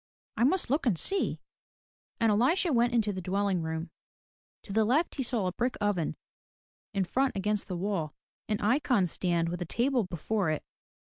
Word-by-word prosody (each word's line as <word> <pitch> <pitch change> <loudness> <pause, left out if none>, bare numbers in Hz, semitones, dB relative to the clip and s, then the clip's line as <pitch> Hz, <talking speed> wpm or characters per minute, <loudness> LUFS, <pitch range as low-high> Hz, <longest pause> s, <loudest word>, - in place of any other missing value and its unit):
"I 235 - +3
must 340 -2 +2
look 280 -1 +1
and 200 -8 +3
see/* 390 - -1 0.8
And 225 -2 +4
Elisha 300 - +3
went 240 0 +3
into 215 -3 +2
the 185 - -4
dwelling 195 0 0
room. 160 +1 -4 0.7
To 195 - -7
the 220 +1 +4
left 275 +10 +2
he 275 - -3
saw 235 -5 0
a 180 - 0
brick 245 +7 -1
oven, 205 -6 0 0.8
in 195 -2 0
front 260 +7 0
against 210 +1 -1
the 180 - -3
wall, 175 -5 -2 0.3
an 210 - 0
icon 240 -2 +3
stand 170 -1 0
with 175 +1 -4
a - - -1
table 245 - +1
before 180 +2 -1
it. 155 - -1
210 Hz, 180 wpm, -29 LUFS, 180-245 Hz, 0.8 s, And